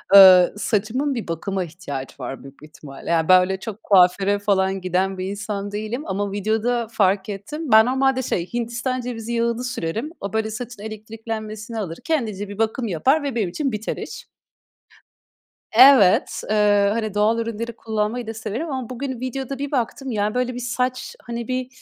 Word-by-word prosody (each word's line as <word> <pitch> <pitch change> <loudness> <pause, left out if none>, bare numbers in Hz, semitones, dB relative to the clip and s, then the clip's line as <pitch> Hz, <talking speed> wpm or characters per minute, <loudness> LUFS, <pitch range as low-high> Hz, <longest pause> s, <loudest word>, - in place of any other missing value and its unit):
Iıı, 185 -2 +9
saçımın 235 +7 0
bir 230 - -4
bakıma 185 +3 -2
ihtiyacı 155 -6 -7
var 130 +1 -6
büyük 135 +1 -14
bir - - -11
ihtimalle. 145 -1 -11
Ya 165 0 +1
ben 185 0 +8
öyle 190 +1 -1
çok 220 0 -8
kuaföre 195 +1 +4
falan 195 -2 +1
giden 185 +1 0
bir 185 - -3
insan 205 0 -4
değilim 215 +7 -4
ama 200 +1 -2
videoda 220 +4 0
fark 195 -2 +1
ettim. 250 +9 -5
Ben 220 +1 +8
normalde 265 +1 +2
şey, 180 -5 -3
Hindistan 240 +2 -2
cevizi 235 -1 -5
yağını 235 +1 0
sürerim. 235 - -3
O 200 - -5
böyle 220 0 -1
saçın 240 -1 -7
elektriklenmesini 220 +1 -6
alır. 170 -5 -4
Kendince 215 -11 -2
bir 205 - -8
bakım 225 +2 0
yapar 260 - +2
ve 275 -4 -3
benim 205 -6 0
için 275 - -2
biter 215 0 -3
iş. - - -8 1.4
Evet, 245 -5 +6
ııı, 205 -1 +4
hani, 215 -2 -2
doğal 215 +2 +2
ürünleri 230 0 -4
kullanmayı 220 +1 -2
da 225 - -4
severim 220 +8 -4
ama 260 -4 -4
bugün 255 0 -4
videoda 265 +1 -4
bir 285 0 -4
baktım 265 0 -2
ya 210 0 -1
böyle 250 0 0
bir 245 - -5
saç, 250 +1 -2
hani, 235 -1 -5
bir 255 0 -2
220 Hz, 175 wpm, -22 LUFS, 195-245 Hz, 1.4 s, Iıı